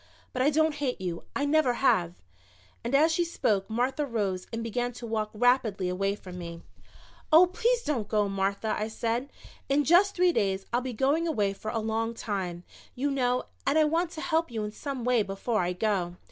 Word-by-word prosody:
But 255 - -1
I 275 - +4
don't 315 +1 +2
hate 285 -5 -2
you 175 -3 -4
I 285 - 0
never 290 -3 +3
have." 180 -9 +2 0.7
And 235 +4 0
as 315 +4 +5
she 345 +2 +2
spoke 230 - 0
Martha 250 +6 0
rose 205 -8 -2
and 230 0 -3
began 245 +2 -2
to 240 - -8
walk 220 -2 -2
rapidly 220 -5 +2
away 195 +2 0
from 180 -3 -10
me. 170 -1 -8 0.7
"Oh, 325 +3 +9
please 470 +7 0
don't 245 -9 -1
go, 210 -2 +1
Martha," 200 +2 -1
I 215 - -2
said. 230 +4 -2 0.4
"In 285 +2 +3
just 360 +7 +4
three 360 0 +4
days 195 -5 0
I'll 245 - +2
be 255 0 -4
going 285 +8 +1
away 205 -11 +1
for 215 +2 -6
a 230 - -2
long 225 +1 -1
time, 185 -6 -4 0.3
you 280 +3 -1
know, 250 -2 +1 0.2
and 280 +3 +3
I 310 - +6
want 330 +3 +1
to 315 - -6
help 330 -1 0
you 225 -3 -3
in 210 - -4
some 270 +2 -5
way 250 -1 +3
before 200 +2 -1
I 175 0 0
go. 180 -3 -1
235 Hz, 200 wpm, -28 LUFS, 200-285 Hz, 0.7 s, Oh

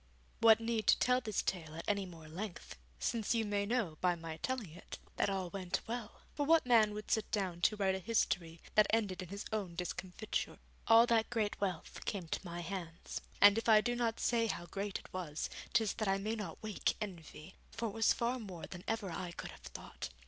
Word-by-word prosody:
What 225 -1 +7
need 225 -2 -1
to - - +7
tell 250 0 +3
this 215 -4 -1
tale 160 -4 -3
at 165 - -6
any 200 -2 +1
more 165 -3 -11
length, 180 +4 -6 0.2
since 230 0 0
you 225 -1 +1
may 205 -1 0
know, 215 -10 0
by 180 -1 +3
my 165 -1 -6
telling 240 -2 -3
it, 170 - -9 0.2
that - - +2
all 190 -3 -2
went 185 -2 -2
well? 235 -2 -5
for 290 - -1
what 320 +1 +5
man 220 -4 +5
would 210 0 -6
sit 220 - +1
down 185 -4 -1
to 215 - +4
write 195 -2 +2
a 190 - -2
history 175 -5 0
that 215 -1 +6
ended 210 -5 +1
in 180 - -7
his 200 +2 -5
own 195 -6 -2
discomfiture? 180 +4 -3 0.3
All 230 +1 +8
that 230 -2 +2
great 215 -4 -1
wealth 185 -5 -3
came 190 -5 -2
to - - -1
my 175 -1 -5
hands, 170 -2 -5 0.2
and 205 +2 +8
if 230 - -2
I 215 -1 +9
do 240 +3 0
not 235 -2 0
say 230 -1 +2
how 175 - -3
great 200 +2 -3
it - - -15
was, 170 -5 -3 0.2
'tis 220 -3 +3
that 215 - -2
I 195 0 +3
may 210 +3 -2
not 205 -5 -6
wake 215 -2 0
envy, 175 -4 -7 0.2
for 230 0 -3
it - - -8
was 225 0 +4
far 240 +2 0
more 185 -7 -7
than 180 -1 -9
ever 220 -4 -1
I 175 +1 -4
could - - -6
have - - -13
thought. - - -7
205 Hz, 220 wpm, -35 LUFS, 180-225 Hz, 0.3 s, I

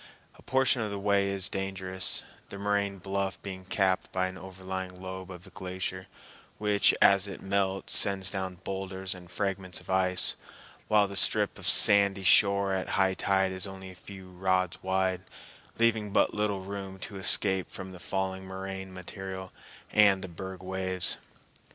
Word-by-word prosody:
A - - -17
portion 130 -1 +2
of 110 - -2
the 100 - -4
way 100 0 +2
is 95 -1 -1
dangerous, 95 -2 -2 0.3
the 100 - -7
moraine 100 -1 0
bluff 95 +1 -3
being 95 -2 -7
capped 95 -1 0
by 95 0 0
an 95 - -9
overlying 95 0 -7
lobe 95 0 -7
of 90 -2 -9
the - - -11
glacier, 95 0 -5 0.5
which 105 -1 +4
as 100 0 +5
it 95 - -7
melts 95 0 0
sends 95 -1 +1
down 95 -2 -3
boulders 95 0 -4
and 90 -1 -13
fragments 95 -1 -3
of - - -8
ice, 90 -1 +2 0.5
while 105 -1 +4
the 100 - -8
strip - - +4
of - - -3
sandy 100 -1 +5
shore 100 0 +4
at 95 -1 -2
high 95 -1 +3
tide 95 0 +1
is 95 +1 -4
only 95 -1 -9
a - - -14
few 95 0 -11
rods 95 -1 0
wide, 95 -1 0 0.6
leaving 110 -2 +2
but - - +3
little 105 -2 -1
room 95 0 -6
to 100 +1 -7
escape 95 0 +3
from 95 0 -7
the 90 - -11
falling 95 0 -3
moraine 95 0 -6
material 95 0 -7 0.4
and 100 -2 +5
the - - -5
berg 95 +2 -8
waves. 95 -1 0
95 Hz, 165 wpm, -29 LUFS, 95-100 Hz, 0.6 s, as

